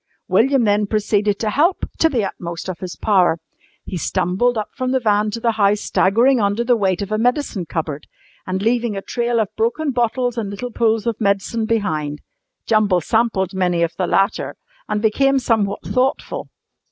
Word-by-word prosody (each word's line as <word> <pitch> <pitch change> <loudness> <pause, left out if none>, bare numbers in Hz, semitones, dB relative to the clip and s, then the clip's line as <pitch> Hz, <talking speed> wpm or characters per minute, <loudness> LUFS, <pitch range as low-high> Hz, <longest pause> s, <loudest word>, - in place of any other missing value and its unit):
William 245 +7 +3
then 205 -1 +2
proceeded 210 -1 +1
to 215 -1 -1
"help" 330 - +1
to 325 - +4
the 245 -8 0
utmost 170 -2 -6
of 185 -2 -5
his 185 -2 -6
power. 185 -6 +2 0.5
He 185 - -5
stumbled 185 +8 0
up 215 - -3
from 255 -1 -2
the 260 - +3
van 210 -2 +2
to 225 +2 -4
the 230 0 +1
house 210 -1 +2
staggering 235 +6 +3
under 205 +3 +1
the 245 0 +3
weight 195 -3 0
of 200 - -7
a 215 - 0
medicine 245 - 0
cupboard, 150 -3 -4 0.4
and 190 +1 -2
leaving 235 -2 0
a 195 - -5
trail 240 -1 -1
of 215 -3 -2
broken 260 +7 0
bottles 245 0 0
and 210 -3 -3
little 210 +5 -5
pools 225 -2 +1
of 230 -1 -2
medicine 200 +3 0
behind. 155 -10 -1 0.4
Jumble 210 -4 +3
sampled 215 -2 0
many 180 -2 +1
of 170 0 -2
the 180 0 -1
latter 195 +4 0 0.3
and 210 +1 -1
became 270 +5 +3
somewhat 220 -6 0
thoughtful. 270 - -1
215 Hz, 180 wpm, -20 LUFS, 195-240 Hz, 0.5 s, to